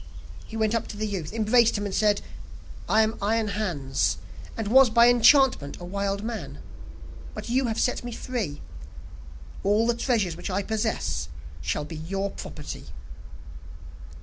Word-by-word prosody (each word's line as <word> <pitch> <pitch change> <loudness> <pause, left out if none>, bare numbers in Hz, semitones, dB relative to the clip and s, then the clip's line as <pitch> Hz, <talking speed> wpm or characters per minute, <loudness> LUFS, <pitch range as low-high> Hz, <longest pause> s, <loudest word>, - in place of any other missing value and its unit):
He 225 - -7
went 220 0 +1
up 230 - -1
to 205 - -8
the 215 - -2
youth, 190 -7 -4
embraced 225 +1 +3
him 205 - -3
and 200 - -4
said: 210 0 +2 0.7
'I 220 - +5
am 220 +1 -1
Iron 215 +1 +1
Hans, 170 -11 -1 0.4
and 225 -2 -2
was 260 +3 +7
by 235 +1 +6
enchantment 245 - +5
a - - -9
wild 200 +2 -2
man, 230 0 -5 0.8
but - - -6
you 260 +2 +2
have 225 -1 -2
set 250 - 0
me 240 - -5
free; 225 - -4 1.0
all 210 +3 +3
the 240 - +3
treasures 230 -8 0
which - - -6
I 195 +2 -1
possess, 215 - -2 0.3
shall 75 - -2
be 155 +1 -8
your 195 +5 -3
property. - - -8
215 Hz, 155 wpm, -26 LUFS, 195-230 Hz, 1.0 s, was